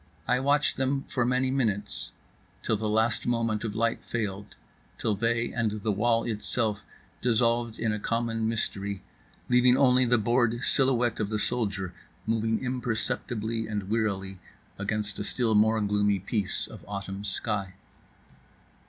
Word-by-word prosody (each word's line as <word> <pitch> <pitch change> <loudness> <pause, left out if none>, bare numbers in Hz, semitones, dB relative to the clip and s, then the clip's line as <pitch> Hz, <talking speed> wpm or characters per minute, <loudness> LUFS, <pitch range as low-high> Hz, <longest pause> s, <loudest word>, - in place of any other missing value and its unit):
I 125 - +3
watched 145 +2 +2
them 135 +1 0
for 120 -2 -1
many 130 +1 +2
minutes; 110 -7 -1 0.5
till 110 - +1
the 110 0 -2
last 110 +1 +1
moment 115 -3 0
of 110 -2 -3
light 115 +1 0
failed; 105 -3 -4 0.4
till 110 - 0
they 115 +3 0
and 115 -3 +1
the 105 +1 -2
wall 115 +3 +2
itself 105 -1 -1 0.4
dissolved 115 -1 +2
in 110 -2 0
a 105 - -2
common 115 0 -1
mystery, 100 -3 -2 0.4
leaving 125 0 +5
only 125 -1 +5
the 120 0 +4
bored 120 +2 +2
silhouette 125 -4 +2
of 105 -2 -1
the 105 - 0
soldier 100 -6 -1 0.3
moving 110 +1 0
imperceptibly 115 -2 -2
and 105 -2 -3
wearily 95 -4 -1 0.4
against 105 0 -2
a - - -1
still 115 +1 0
more 110 +1 +4
gloomy 105 0 +2
piece 100 +1 -2
of - - -11
autumn 100 -1 -5
sky. 100 -2 -2
110 Hz, 145 wpm, -28 LUFS, 105-120 Hz, 0.5 s, leaving